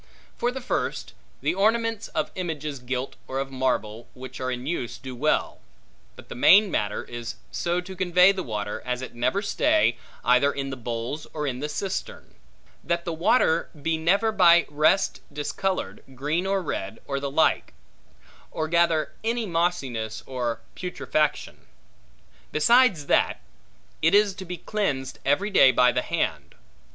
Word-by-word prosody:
For 240 +1 0
the 265 +1 -6
first, 250 - -3 0.3
the - - +1
ornaments 225 +3 +1
of 155 - -2
images 155 -6 -4
gilt, 125 +1 -4
or 130 - -4
of 135 0 -3
marble, 120 -3 -2
which 130 0 -9
are 130 - -1
in 125 0 -4
use, 140 -6 -3
do 130 -1 -8
well: 155 +5 0 0.6
but - - -14
the - - -7
main 195 - +6
matter 105 -5 -1
is 120 -1 -7 0.2
so 175 +1 -1
to 190 +1 -9
convey 180 +1 +5
the 195 -1 -3
water, 105 - -4
as 125 0 -3
it - - -7
never 120 - 0
stay, 310 +9 +2 0.3
either 125 +4 +4
in 135 -1 -4
the - - -4
bowls 120 +4 -5
or 150 -1 -2
in 130 -3 -2
the 150 +2 -3
cistern; 190 +5 -5 0.5
that 170 0 -1
the 170 - -2
water 165 0 +2
be 160 +3 0
never 195 +8 +2
by 175 -5 +6
rest 155 +6 +2
discolored, 185 +6 -3
green 150 +8 -1
or 195 -1 0
red 110 - -4
or 140 0 -2
the 140 0 -3
like; 155 +3 +1 0.7
or 155 - -3
gather 170 -1 +2
any 230 +1 0
mossiness 145 - -1
or 120 -3 -3
putrefaction. 155 -4 -2 0.8
Besides 205 - +4
that, - - +2 0.6
it 165 +4 +4
is 205 -1 +4
to 190 0 -8
be 180 0 -5
cleansed 140 -13 -2
every 190 +10 +1
day 135 -9 +7
by 125 -1 +4
the - - 0
hand. - - -2
155 Hz, 160 wpm, -25 LUFS, 130-190 Hz, 0.8 s, day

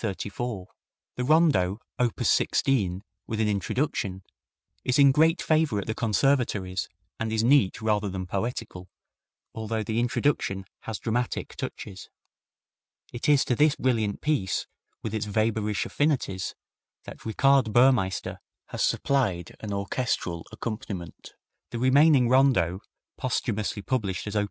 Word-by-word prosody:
The 105 0 -4 0.5
Rondo, 125 - +3 0.2
op. 120 -2 0
16, 100 -8 +1 0.2
with 110 - -3
an 110 - +2
Introduction, 100 -2 -1 0.6
is 125 - +1
in 140 -1 +7
great 160 +5 +3
favor 155 -8 +2
at 100 - -2
the 110 - -2
conservatories, 110 -5 0 0.3
and 115 -1 -2
is 110 0 +1
neat 120 -5 +3
rather 105 -2 +1
than 95 -1 -4
poetical, 100 -1 -4 0.6
although 110 0 -3
the 110 +2 -1
introduction 120 -5 0 0.2
has 110 -2 -3
dramatic 120 +1 -2
touches. 95 -2 -7 1.0
It 120 +4 -2
is 145 -2 +5
to 125 - +1
this 150 +3 +4
brilliant 115 -7 0
piece, 145 -11 0 0.4
with 110 - -4
its 110 -1 -2
Weber 110 0 0
ish 105 - -1
affinities, 135 - -1 0.5
that - - -10
Richard 130 +1 +3
Burmeister 120 -6 +2 0.3
has - - -4
supplied 105 -12 0
an 105 - -6
orchestral 100 -4 -2
accompaniment. 105 -6 -6 0.4
The - - -5
remaining 130 +1 +5
Rondo, 125 -9 +3 0.4
posthumously 110 -5 -2
published 100 -9 -2
as 105 0 -5
op. - - +3
110 Hz, 125 wpm, -26 LUFS, 100-130 Hz, 1.0 s, in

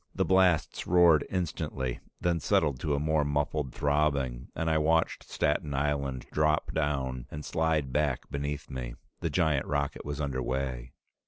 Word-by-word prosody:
The - - +1
blasts 95 -4 +2
roared 85 -4 +5
instantly, 75 -8 -2 0.2
then 85 -1 +1
settled 70 -2 +1
to 75 +1 0
a - - 0
more 80 0 +2
muffled 70 -1 -1
throbbing, 70 -4 0
and 80 - -2
I 80 -1 +3
watched 80 +2 +1
Staten 75 -1 0
Island 70 -2 -1
drop 75 0 +1
down 65 -4 -1
and 75 0 -7
slide 80 -5 0
back 75 -4 0
beneath 70 +1 -3
me. - - -5 0.2
The 85 - -1
giant 75 -3 +1
rocket 70 -1 -1
was 75 0 -4
under 70 -3 -2
way. 65 -2 -3
75 Hz, 155 wpm, -29 LUFS, 65-80 Hz, 0.2 s, roared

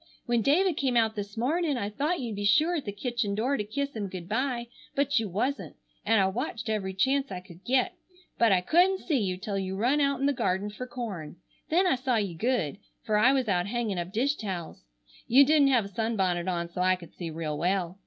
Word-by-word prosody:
When 240 -2 +1
David 325 - +3
came 260 -3 +1
out 225 -1 +2
this 205 0 -6
morning 295 +4 0
I 205 -3 -3
thought 300 +11 -1
you'd 215 -5 -4
sure 310 +10 +4
be 340 - +1
at - - -11
the 205 - -3
kitchen 215 -1 -2
door 250 +7 +1
to 210 - -1
kiss 280 +6 -3
him 205 -2 -3
good 180 -2 -7
bye, 240 +2 -1 0.3
but 280 -2 +2
you 220 -3 -3
wasn't, 250 +10 -2 0.3
and 225 -1 +3
I 190 - +4
watched 230 +3 -3
every 195 -3 -2
chance 270 +5 +1
I 185 - -4
could 180 0 -15
get, 265 +8 +1 0.5
but 230 -2 +5
I 185 -2 +4
couldn't 360 - +3
see 300 -6 0
you 185 -4 -1
till 200 0 -3
you 190 0 -3
run 250 +9 +2
out 280 -2 +1
in 275 - 0
the 285 - +3
garden 200 -3 -1
fer 250 +5 -7
corn. 210 -12 -6 0.3
Then 355 +4 +3
I 365 - +4
saw 255 -1 0
you 200 -5 0
good, 205 - -1 0.2
fer 215 -2 0
I 245 +5 +5
was 265 -3 +1
out 180 -2 +1
hangin' 220 -4 -2
up 175 +1 -4
dish 260 +7 +1
towels. 185 -6 -5 0.5
You 275 +4 +7
didn't 295 -1 +5
have 250 -6 +3
a - - -8
sunbonnet 190 -5 -1
on, 170 -2 -1
so 170 +1 -5
I 185 0 +4
could 175 -3 -13
see 170 -2 -6
real 155 -1 -4
well. 180 +3 -1
220 Hz, 235 wpm, -28 LUFS, 190-270 Hz, 0.5 s, You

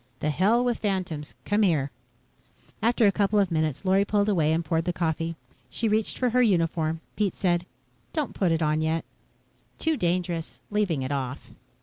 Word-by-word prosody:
"The 150 - 0
hell 215 +10 +3
with 245 -2 0
phantoms. 185 -8 -2
Come 205 +1 +2
here." 155 -9 +2 0.9
After 230 +1 +3
a 200 - +6
couple 205 +1 +1
of 195 -3 +2
minutes, 155 +1 -1
Lorry 190 +1 +4
pulled 205 0 +1
away 160 -6 +2
and 165 +1 0
poured 160 +2 0
the 180 - 0
coffee. 165 -1 -1 0.3
She 230 - -1
reached 215 0 0
for 250 -2 +1
her 250 +2 +4
uniform. 165 -6 +1
Pete 205 -4 0
said, 175 -1 0 0.4
"Don't 305 -4 -2
put 185 -4 +1
it 165 0 +1
on 155 0 +1
yet." 160 +1 0 0.7
"Too 320 -2 0
dangerous 175 -3 -1
leaving 195 -10 0
it 130 - -3
off." 135 -1 -4
175 Hz, 180 wpm, -26 LUFS, 160-210 Hz, 0.9 s, a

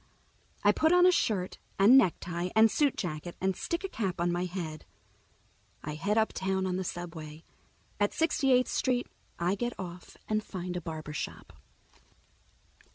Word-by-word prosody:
I - - +6
put 315 +1 +2
on 360 0 +6
a 365 - +7
shirt 205 - 0 0.2
and 205 +6 +7
necktie 175 -6 +2
and 220 0 +6
suit 290 -3 +2
jacket 170 -1 -4
and 190 0 0
stick 340 - -3
a - - -1
cap 195 - -3
on 175 0 +1
my 175 +1 -1
head. 170 -4 -5 1.0
I 150 - -4
head 200 +8 -1
uptown 190 -3 0
on 185 -1 -1
the 190 - -1
subway. 165 -3 -7 0.6
At 205 0 +2
Sixty 315 -4 +1
eighth 250 0 +4
Street 250 -2 +1 0.3
I 175 +2 +1
get 240 +4 -3
off 180 -1 -8
and 215 0 0
find 180 -3 -5
a 180 - -2
barbershop. 155 -2 -6
185 Hz, 160 wpm, -30 LUFS, 175-225 Hz, 1.0 s, a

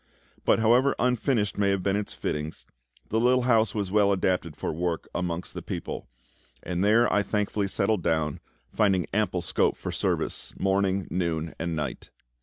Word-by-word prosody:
But - - +5
however 120 +5 +4
unfinished 120 -4 +1
may 100 -1 +3
have 100 -2 0
been 100 0 +1
its 105 0 -3
fittings, 75 +1 -4 0.4
the 110 - +1
little 125 +1 +3
house 115 -4 +3
was 100 -3 -2
well 100 -1 +4
adapted 90 -5 0
for - - -3
work 85 0 -2
amongst 90 -1 -3
the - - -5
people; - - -5 0.6
and 90 +1 -1
there 110 +3 +4
I 105 - +4
thankfully 105 0 -1
settled 100 +1 +1
down, 80 -3 0 0.3
finding 95 -5 +2
ample 100 -4 +1
scope 80 - +1
for - - -5
service, - - -2
morning, 95 0 +1
noon, 85 -3 -1
and 85 0 -2
night. 75 -2 -4
100 Hz, 165 wpm, -27 LUFS, 85-110 Hz, 0.6 s, But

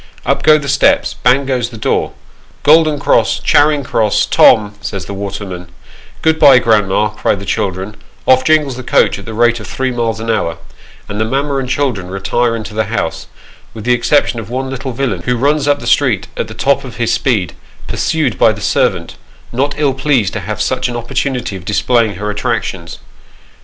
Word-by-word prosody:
Up - - +1
go 155 0 +6
the 145 -2 -6
steps, 140 0 +2
bang 130 +2 +2
goes 125 -3 -1
the 115 - -10
door, 110 - -1 0.2
" - - -31
Golden 155 0 +4
Cross, 140 - +2
Charing 145 -1 +3
Cross, 110 -4 +1
Tom," 105 -1 +4
says 100 -1 -5
the 100 - -7
waterman; 95 -3 -6 0.3
" - - -23
Good 160 0 +2
bye, 140 -4 +7
grandma," 105 -3 +2
cry 105 0 -1
the 100 0 -8
children, 95 +2 -3 0.3
off 130 0 +4
jingles 150 -4 +2
the - - -5
coach - - +2
at - - -11
the 110 -2 -7
rate 120 +1 +2
of 110 - -9
three 130 -1 -2
miles 115 -2 -2
an 115 +1 -2
hour, 85 -7 -1 0.5
and 105 +1 -4
the - - +3
mamma 140 +5 -1
and 130 -2 -3
children 125 -10 -1
retire 115 +5 -1
into 110 -1 -6
the 110 0 -1
house, 80 -7 -3 0.5
with 110 - -7
the 125 +2 +2
exception 120 0 +1
of 115 - -8
one 130 +2 -3
little 135 0 -5
villain, 135 +1 -2
who 125 -1 -1
runs 145 +3 +1
up 145 0 +3
the - - -9
street - - +1
at - - -3
the - - -10
top - - +1
of - - -9
his - - 0
speed, - - 0 0.3
pursued - - -1
by - - +5
the - - -7
servant; - - -1 0.3
not 140 +4 -1
ill 145 -3 +1
pleased 130 -7 0
to 110 - -3
have 105 +2 -5
such 130 +2 -1
an 120 - -5
opportunity 120 -1 -3
of 95 - -8
displaying 110 +2 +1
her 105 +3 -3
attractions. 95 -4 -3
120 Hz, 200 wpm, -14 LUFS, 105-135 Hz, 0.5 s, bye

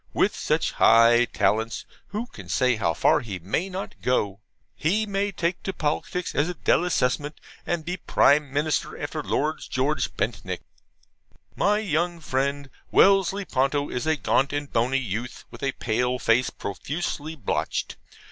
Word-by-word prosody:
With - - +2
such - - 0
high 115 +1 +6
talents, 110 0 0 0.2
who 215 +3 -4
can - - -12
say 125 -1 +2
how 85 -7 0
far - - +4
he 110 -8 -5
may 100 - -2
not 190 +1 -5
go? 100 -6 0 0.3
He 205 +8 +1
may 200 0 -1
take 170 -1 -2
to 195 - -3
politics 160 +3 -2
as 150 +4 +1
a 180 - -4
DELASSEMENT, 150 -5 +1 0.3
and 170 -3 -1
be 180 +2 -3
Prime 145 -4 +3
Minister 145 +2 -1
after - - -3
Lord 155 +2 -1
George 135 +2 0
Bentinck. 100 -4 -2 0.9
My 205 +1 +3
young 175 -4 -1
friend 140 -1 -2 0.2
Wellesley 195 0 +4
Ponto 140 +1 0
is 125 +5 -3
a 160 - +3
gaunt 140 -1 +1
and 145 -1 -4
bony 120 +3 +2
youth, 120 0 -4
with - - -11
a 135 -1 0
pale 125 +2 0
face 125 +1 +2
profusely 150 - -4
blotched. 125 -10 -2
145 Hz, 150 wpm, -25 LUFS, 125-170 Hz, 0.9 s, high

